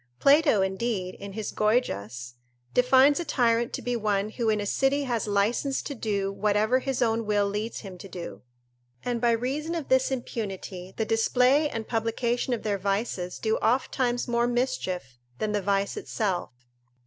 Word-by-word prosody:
Plato, 280 - +5
indeed, 190 -1 -2
in 200 -1 -9
his 215 0 -4
Goygias, 125 - -1 0.4
defines 260 +4 +5
a - - -1
tyrant 235 -5 +1
to - - -4
be 245 0 -1
one 210 -2 0
who 225 0 -1
in 215 -1 +2
a 205 - -2
city 270 +6 +1
has 240 -5 -1
licence 215 +7 +1
to 285 - -4
do 200 -5 -1
whatever 210 +5 +2
his 265 -1 -1
own 225 0 +1
will 205 -1 +2
leads 210 +3 -3
him 190 -3 -9
to 195 - -10
do; 175 -1 -7 0.6
and 240 -2 -1
by 240 - +3
reason 270 +8 -1
of 320 -5 -4
this 260 0 +4
impunity, 195 -7 -5
the 220 - 0
display 250 +6 +3
and 225 -4 -5
publication 235 +2 -1
of 240 - -1
their 205 -2 -1
vices 195 -2 -2
do 220 0 0
ofttimes 245 +1 +1
more 235 0 +2
mischief 185 - -2 0.2
than 215 - -1
the 205 -1 0
vice 200 +1 0
itself. 190 -5 -2
225 Hz, 170 wpm, -27 LUFS, 200-250 Hz, 0.6 s, Plato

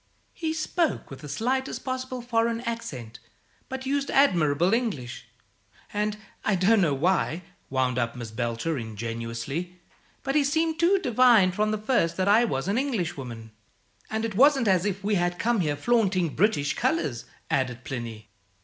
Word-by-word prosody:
He 320 -2 -2
spoke 320 - -1
with 135 - -8
the 150 - -9
slightest 260 - -2
possible 255 -1 -4
foreign 230 -1 0
accent, 130 - -6 0.5
but 265 0 -5
used 280 +1 -1
admirable 175 - +3
English: 210 - -2 0.7
and, 210 0 -1 0.3
I 210 - +2
don't 200 +4 +4
know 155 -6 +2
why," 170 +2 +1 0.3
wound 130 -1 0
up 115 0 -1
Miss 120 -3 -7
Belcher, 120 +6 -2
ingenuously, 115 - -5 0.4
"but 270 - -1
he 300 0 +4
seemed 320 +3 0
to 350 +4 +4
divine 240 - +5
from 210 +3 0
the 215 - 0
first 210 -6 +1
that 190 +1 +1
I 220 +4 +5
was 135 - -2
an 205 +5 +1
Englishwoman." 140 - -3 0.6
"And 220 +1 -1
it 225 - -3
wasn't 270 +2 +5
as 185 -1 +3
if 195 0 -3
we 210 +1 0
had 175 0 0
come 235 +1 +1
here 150 -5 0
flaunting 190 -1 +2
British 150 -4 +1
colours," 150 -8 -1 0.3
added 125 -2 0
Plinny. 115 -5 -6
190 Hz, 160 wpm, -26 LUFS, -, 0.7 s, divine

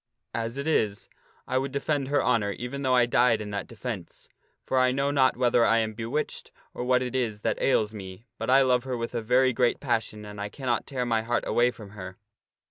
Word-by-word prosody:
As 115 +2 -3
it 140 +2 -3
is, 105 -10 0 0.4
I 130 - +1
would 135 +1 -3
defend 140 0 -1
her 145 +1 +1
honor 105 -5 +1
even 125 +5 -5
though 130 -2 +2
I 125 -1 +5
died 120 -1 +3
in 105 -1 -6
that 100 -3 -4
defence. - - -7 0.4
For 130 - +1
I 130 0 +4
know 140 +2 0
not 130 -3 +3
whether 120 -1 +3
I 115 0 +4
am 110 -1 0
bewitched 115 +7 -3 0.2
or - - -4
what 125 0 +2
it 125 - -4
is 110 -5 -1
that - - -1
ails 110 -5 +2
me, 95 +1 -9
but - - -3
I 135 +1 +6
love 125 -1 +2
her 130 -2 -3
with 115 +1 -4
a 120 - -1
very 125 +3 +3
great 120 0 +2
passion 110 -4 -2
and 105 0 -8
I 105 - -3
cannot 125 -1 -2
tear 130 -3 -2
my 115 -2 +1
heart 120 +2 -1
away 120 +1 +3
from 105 -5 -10
her." 95 -2 -9
120 Hz, 225 wpm, -27 LUFS, 110-130 Hz, 0.4 s, I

